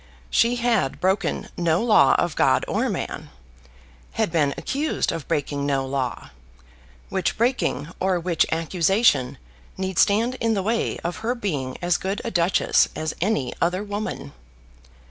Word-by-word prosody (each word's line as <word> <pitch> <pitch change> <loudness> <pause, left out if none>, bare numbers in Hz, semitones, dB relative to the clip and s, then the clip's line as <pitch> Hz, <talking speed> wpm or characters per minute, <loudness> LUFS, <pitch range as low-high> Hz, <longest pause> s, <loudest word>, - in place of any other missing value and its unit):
She 235 +1 +3
had 235 - 0
broken 190 +2 0
no 170 +3 +1
law 230 -3 +5
of 175 -2 0
God - - +3
or - - 0
man, - - -4 0.8
had 220 -6 0
been 145 -4 +1
accused 295 +3 -1
of 160 - -6
breaking 145 -2 -1
no 135 -2 0
law, 130 -2 -3 0.8
which 190 -2 -1
breaking 225 - 0
or 185 -1 +1
which 170 -1 +1
accusation 165 - +2 0.4
need 190 -2 -2
stand 230 +5 +3
in 225 -1 +1
the 195 - -1
way 225 +3 0
of 175 +1 -3
her 225 +3 -2
being 145 - -3
as 175 0 +2
good 195 +2 -3
a - - -2
duchess 175 +1 +3
as 155 0 -3
any 160 - 0
other 180 +4 +1
woman! 205 - -5
185 Hz, 145 wpm, -23 LUFS, 155-215 Hz, 0.8 s, law